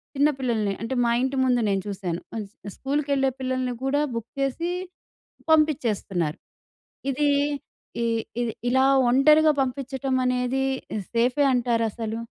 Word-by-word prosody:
చిన్న 285 +2 +4
పిల్లల్ని 220 -6 0
అంటే, 230 +3 -3
మా 235 - +2
ఇంటి 265 +1 -1
ముందు 245 -1 +2
నేను 195 -1 +1
చూసాను. 185 -4 -3 0.2
అస్ 205 -3 -5 0.3
స్కూల్‌కెళ్ళే 275 -1 0
పిల్లల్ని 255 -1 -1
కూడా 280 +2 +1
బుక్ 230 0 -5
చేసి, 330 +6 -1 0.8
పంపిచ్చేస్తున్నారు. 230 - +1 0.7
ఇది 290 +2 +1 0.8
ఈ - - +1 0.4
ఇది 230 -2 -1 0.2
ఇలా 260 +2 +4 0.2
ఒంటరిగా 305 +4 +6
పంపిచ్చటం 265 0 -1
అనేది 250 +1 0 0.3
ఇ - - -1 0.2
సేఫే 250 +5 +2
అంటారా 235 -2 +1
అసలు? 225 0 -4
255 Hz, 125 wpm, -25 LUFS, 230-275 Hz, 0.8 s, ఒంటరిగా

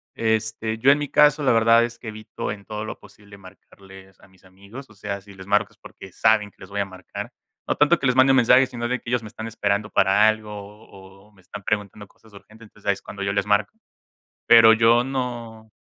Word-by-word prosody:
Este, 110 0 -2
yo 130 +5 +4
en 145 - +3
mi 145 -1 -4
caso, 150 0 +4
la 135 - +3
verdad 115 +1 +4
es 120 0 -6
que - - -11
evito 110 -1 -7
en 100 -1 -13
todo 105 0 -6
lo - - -7
posible 100 0 -17
marcarles 95 0 -17
a - - -19
mis 95 -1 -26
amigos, 100 +8 -13
o - - -18
sea, 100 -1 -6
si 100 +1 -16
les 95 0 -13
marco 105 +1 +1
es - - -30
porque 95 - -14
saben 110 -2 +2
que - - -39
les 95 - -13
voy 100 0 -5
a - - -1
marcar, 95 -2 -9 0.4
no - - 0
tanto 150 +4 +3
que 135 - -1
les 125 - +1
mande 130 +1 +5
un 135 - +4
mensaje, 125 +1 +5
sino 120 -1 -5
de 125 +1 -2
que - - -10
ellos 125 0 0
me - - -9
están 110 +1 -8
esperando 105 -1 -2
para 100 +3 +3
algo 110 -1 -1
o 105 +1 -11
o 95 +1 -17
o - - -28
me 95 - -23
están 95 +3 -11
preguntando 105 0 -4
cosas 110 +2 -24
urgentes, 110 +3 -16
entonces, 105 0 -18
ahí 100 - +3
es 100 - -12
cuando 100 - -10
yo 100 0 -2
les 100 -1 -1
marco. 105 0 0 0.7
Pero 115 -1 +8
yo 115 +2 +4
no 120 -4 -6
105 Hz, 245 wpm, -22 LUFS, 100-115 Hz, 0.7 s, Pero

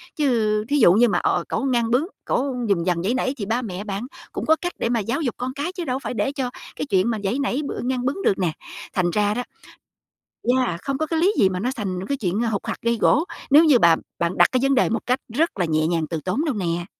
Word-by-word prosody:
Chứ 225 -7 +1
thí 290 - +2
dụ 175 - +7
như 235 +5 +5
mà, - - +1
ờ, - - +1
cẩu - - -1
ngang 240 -3 +1
bướng, 255 +6 +3 0.2
cẩu 265 0 0
dùng 170 -4 +1
dằng, 175 -2 0
giãy 210 +6 +1
nảy 260 +1 0
thì 205 - -4
ba 230 +5 0
mẹ 200 -4 -5
bạn 205 +3 -4 0.2
cũng - - -4
có 315 - +5
cách 355 0 -3
để - - 0
mà 235 -1 +1
giáo 235 +9 -2
dục 250 -6 -2
con 255 +1 -4
cái 290 +6 -3
chứ 370 -2 -5
đâu 260 -2 -1
phải - - -5
để 270 - 0
cho 270 -3 -3 0.3
cái - - -3
chuyện 195 -4 +2
mà 225 - -1
giãy 200 +7 0
nảy, 280 0 0
b - - -4
ngang 250 -1 -1
bướng 280 +9 -1
được 195 - +2
nè. 180 -4 +1 0.4
Thành 180 -2 +1
ra 205 +2 +1
đó 245 +3 -2 1.2
yeah, 170 -1 -4
không 275 -1 -2
có 315 - 0
cái 325 +1 -1
lý 375 +5 +4
gì 195 - +5
mà 185 -1 -3
nó 245 +5 0
thành 190 -3 -3
cái 280 - 0
chuyện 200 -4 -1
hục 225 -4 -2
hặc, - - -3
gây 235 0 +1
gổ, 310 - +4 0.3
nếu 300 +4 +8
như 295 -6 +6
bạn 170 -5 +5 0.2
bạn 170 +1 -1
đặt - - +7
cái 255 - +2
vấn 275 0 +3
đề 255 - +3
một 230 - -1
cách 250 +3 +1
rất 320 -3 0
là 180 - +2
nhẹ 155 -1 +1
nhàng 165 -1 0
từ 165 -2 -2
tốn 200 - 0
đâu 300 -5 0
nè. 175 -4 -2
235 Hz, 275 wpm, -22 LUFS, 190-270 Hz, 1.2 s, nếu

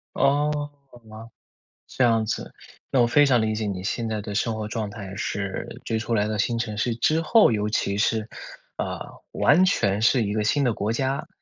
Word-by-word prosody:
哦， 145 +2 +2 0.4
好 - - -14
吧， 110 +1 -10 0.6
这 130 - -2
样 115 -2 +3
子。 110 - -4 0.4
那 130 - +3
我 120 - +5
非 145 +4 +4
常 125 -4 +3
理 110 0 0
解 110 -1 -2
你 95 -2 -4
现 115 +3 -2
在 110 -1 -2
的 100 0 -6
生 110 +2 0
活 110 -1 -4
状 110 -1 -3
态 100 -2 -8
是 100 -3 -4
追 110 - -1
出 115 +1 -2
来 105 -1 +2
的 105 -1 -2
新 115 +3 0
城 110 -2 -3
市 115 +1 0
之 155 +6 +2
后， 185 - +5
尤 105 0 0
其 100 -2 -1
是， 110 0 0 0.5
呃， - - -3 0.3
完 170 +6 +4
全 105 - +1
是 120 +2 +3
一 105 -1 -2
个 105 0 -1
新 145 +6 +2
的 125 - +2
国 105 +1 -2
家。 135 +6 -2
110 Hz, 225 characters per minute, -24 LUFS, 105-125 Hz, 0.6 s, 我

